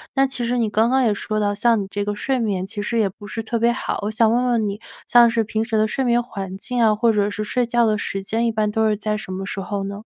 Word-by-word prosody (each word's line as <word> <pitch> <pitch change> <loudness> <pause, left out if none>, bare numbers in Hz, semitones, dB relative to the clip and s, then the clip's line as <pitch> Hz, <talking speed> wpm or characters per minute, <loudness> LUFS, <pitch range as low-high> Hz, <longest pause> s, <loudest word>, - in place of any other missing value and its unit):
那 270 0 +4
其 250 -2 -3
实 245 +1 0
你 225 -2 +1
刚 220 +2 +2
刚 265 0 +3
也 225 - +3
说 215 +1 -2
到， 205 -1 0
像 230 0 +2
你 195 - -5
这 205 0 -3
个 205 - -1
睡 260 +5 -1
眠 195 -5 -1
其 205 0 -5
实 230 +2 -1
也 205 - +2
不 200 +2 -13
是 225 - -4
特 235 +2 -2
别 235 +1 +3
好， - - -3
我 210 - -1
想 220 0 +3
问 245 +2 +2
问 230 -4 +1
你 200 +1 -5 0.3
像 240 0 +7
是 230 -1 +1
平 220 +1 -2
时 225 -1 -2
的 215 0 +3
睡 265 +4 -2
眠 240 0 +3
环 195 -6 -6
境 245 +4 -2
啊， 215 -1 +5
或 230 +1 +3
者 205 -1 +1
是 215 - -3
睡 245 +3 0
觉 235 0 +2
的 215 - +1
时 195 -1 -3
间 225 +4 -1
一 - - +1
般 215 -1 0
都 220 +1 +1
是 215 - +2
在 210 0 -2
什 190 - -8
么 190 +1 -4
时 200 - -4
候 195 +1 -3
呢？ 200 +2 -6
220 Hz, 330 characters per minute, -21 LUFS, 205-235 Hz, 0.3 s, 像